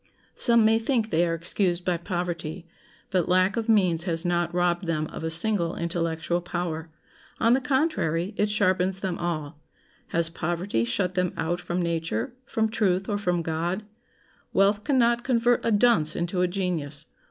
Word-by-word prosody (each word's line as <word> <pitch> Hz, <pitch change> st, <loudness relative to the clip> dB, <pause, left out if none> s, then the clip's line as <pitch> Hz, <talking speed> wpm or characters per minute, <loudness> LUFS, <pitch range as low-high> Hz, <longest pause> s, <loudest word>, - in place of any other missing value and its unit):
Some 235 Hz, -2 st, +4 dB
may 225 Hz, +1 st, +4 dB
think 230 Hz, -2 st, 0 dB
they 170 Hz, +2 st, +2 dB
are 165 Hz, -, 0 dB
excused 175 Hz, +1 st, +1 dB
by 180 Hz, -2 st, +1 dB
poverty; 175 Hz, -1 st, -4 dB, 0.5 s
but 180 Hz, -3 st, +1 dB
lack 185 Hz, +2 st, +3 dB
of 230 Hz, -1 st, -2 dB
means 180 Hz, -6 st, +3 dB
has 165 Hz, -1 st, 0 dB
not 175 Hz, -1 st, 0 dB
robbed 175 Hz, 0 st, 0 dB
them 155 Hz, -2 st, 0 dB
of -, -, -6 dB
a 160 Hz, -, -1 dB
single 170 Hz, 0 st, +2 dB
intellectual 170 Hz, 0 st, -2 dB
power. 170 Hz, -3 st, -4 dB, 0.5 s
On 230 Hz, +1 st, +4 dB
the 265 Hz, -, +2 dB
contrary, 260 Hz, -, 0 dB
it 210 Hz, 0 st, +1 dB
sharpens 190 Hz, -2 st, +1 dB
them 185 Hz, -3 st, -3 dB
all. 155 Hz, -3 st, -3 dB, 0.5 s
Has 170 Hz, 0 st, +1 dB
poverty 170 Hz, -, -2 dB
shut 175 Hz, +10 st, -1 dB
them 180 Hz, -1 st, 0 dB
out 170 Hz, +2 st, -1 dB
from 180 Hz, 0 st, -2 dB
nature, 170 Hz, +9 st, -2 dB
from 220 Hz, 0 st, 0 dB
truth, 195 Hz, -4 st, 0 dB
or 205 Hz, -1 st, -1 dB
from 180 Hz, -4 st, 0 dB
God? 170 Hz, +5 st, -2 dB, 0.7 s
Wealth 200 Hz, +2 st, +3 dB
can 280 Hz, -3 st, +1 dB
not 235 Hz, -1 st, +3 dB
convert 245 Hz, -1 st, +2 dB
a -, -, +1 dB
dunce 205 Hz, -8 st, +3 dB
into 175 Hz, +1 st, -1 dB
a 180 Hz, -, +3 dB
genius. 170 Hz, -6 st, -1 dB
180 Hz, 170 wpm, -26 LUFS, 170-205 Hz, 0.7 s, Some